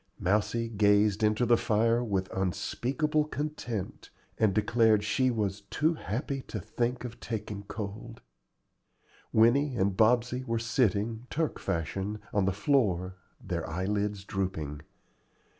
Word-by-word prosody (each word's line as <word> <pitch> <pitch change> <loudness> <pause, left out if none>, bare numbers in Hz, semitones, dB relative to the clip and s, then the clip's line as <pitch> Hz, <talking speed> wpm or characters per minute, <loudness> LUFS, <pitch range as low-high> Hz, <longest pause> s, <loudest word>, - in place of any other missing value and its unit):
Mousie 105 +4 +1
gazed 105 -1 +3
into 110 +3 +2
the 120 0 +5
fire 115 +3 +2
with 95 -5 -1
unspeakable 135 - 0
content, 145 -10 -4 0.3
and 110 -2 +4
declared 110 +1 +3
she 130 +4 +2
was 105 -4 -1
"too 160 +3 +2
happy 135 0 -3
to 110 - -4
think 120 +6 -2
of 120 -1 -8
taking 105 -3 -5
cold." 110 +3 -6 1.1
Winnie 125 +5 +4
and 95 -2 +1
Bobsey 120 +4 +3
were 115 -2 -1
sitting, 115 -1 0
Turk 160 0 -1
fashion, 95 +3 -2 0.2
on 105 -2 +2
the 95 - +2
floor, 95 -5 +1 0.2
their 85 -4 -4
eyelids 100 +3 -1
drooping. 80 -7 -3
110 Hz, 125 wpm, -29 LUFS, 100-120 Hz, 1.1 s, the